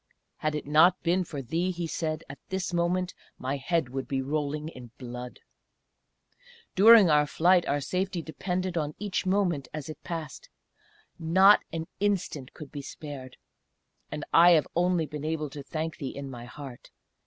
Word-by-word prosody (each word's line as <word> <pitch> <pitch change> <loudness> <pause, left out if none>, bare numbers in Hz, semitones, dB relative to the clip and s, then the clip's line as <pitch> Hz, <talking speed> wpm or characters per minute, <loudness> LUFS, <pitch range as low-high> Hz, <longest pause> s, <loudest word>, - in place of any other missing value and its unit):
"Had 155 0 -1
it 150 - -4
not 160 +5 +5
been 180 +2 +2
for 145 -5 -6
thee," 165 +9 -1
he 175 -2 -3
said, 160 -1 -3
"at 140 - -10
this 190 -2 -2
moment 175 +1 0 0.2
my 135 +2 -2
head 150 0 0
would 135 +1 -4
be 135 - -1
rolling 150 +2 -2
in 125 -6 -11
blood! 125 -1 -7 1.4
"During 215 0 +8
our 150 0 +4
flight 175 +4 +3
our 145 - +1
safety 185 +2 -2
depended 180 +2 -3
on 150 -1 -3
each 200 -2 -2
moment 185 -7 +1
as 155 0 -6
it 155 - -9
passed 165 -5 -6 0.7
not 190 +5 +6
an 165 -1 -3
instant 190 -9 -1
could 150 -3 -10
be 145 - -6
spared 135 -2 -9 0.7
and 150 0 -4
I 175 +1 +8
have 155 -3 +3
only 175 -1 +2
been 150 -1 -7
able 155 -2 -2
to 145 - -7
thank 155 +3 -4
thee 135 - -4
in 140 -1 -6
my 120 -1 -8
heart. 135 -1 -10
155 Hz, 165 wpm, -28 LUFS, 140-180 Hz, 1.4 s, During